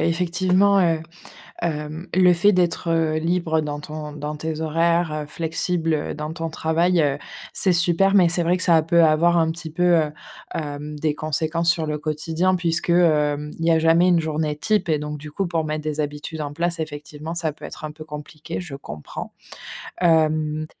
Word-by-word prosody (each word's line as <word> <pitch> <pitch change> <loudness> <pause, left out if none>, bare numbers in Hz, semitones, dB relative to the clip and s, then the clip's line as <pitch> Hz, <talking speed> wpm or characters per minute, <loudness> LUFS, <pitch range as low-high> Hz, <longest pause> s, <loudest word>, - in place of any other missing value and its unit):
effectivement, 185 +3 +2
heu, 165 -3 +2 0.6
hem 155 +1 -4
le 180 -1 +5
fait 200 +5 +4
d'être 175 -2 +1 0.3
libre 165 -1 0
dans 145 -1 -4
ton 150 0 -7
dans 150 +1 -5
tes 160 +1 -4
horaires, 165 +1 +1
heu, - - -8
flexible, 165 +1 -1
heu, 150 - -2
dans 150 +1 -5
ton 165 -1 -4
travail, 165 +3 +1
heu, 145 -1 +1 0.4
c'est 190 - +2
super. 180 +3 +4
Mais 180 -3 +6
c'est 175 0 +1
vrai 175 +2 +2
que 185 - -1
ça 165 -2 +5
peut 170 +1 +3
avoir 170 +3 +3
un 160 -1 +3
petit 165 0 -7
peu, 175 +3 -1 0.2
heu, 150 - -5 0.4
hem, 150 0 -5
des 150 -1 0
conséquences 160 +3 +1
sur 165 -2 -1
le 150 -1 -2
quotidien 160 +4 0
puisque, 170 0 -1
hem, 150 -4 +2
il 165 - -2
y 165 - +4
a 160 - +4
jamais 165 +3 +4
une 175 - +4
journée 155 -1 -2
type 210 -2 0
et 155 -2 +2
donc 150 0 -5
du 150 +1 -9
coup, 195 +4 -2
pour 165 -2 -1
mettre 155 0 -3
des 155 0 -1
habitudes 150 +2 -5
en 145 -1 -4
place, 170 +2 -2
effectivement, 150 +1 -6
ça 160 -3 -1
peut - - -19
être - - -7
un 155 - -5
peu 155 - -10
compliqué, 155 +2 -7
je 175 -6 -7
comprends. 75 - -8 0.7
Hem, 155 -2 +2
160 Hz, 195 wpm, -22 LUFS, 150-170 Hz, 0.7 s, Mais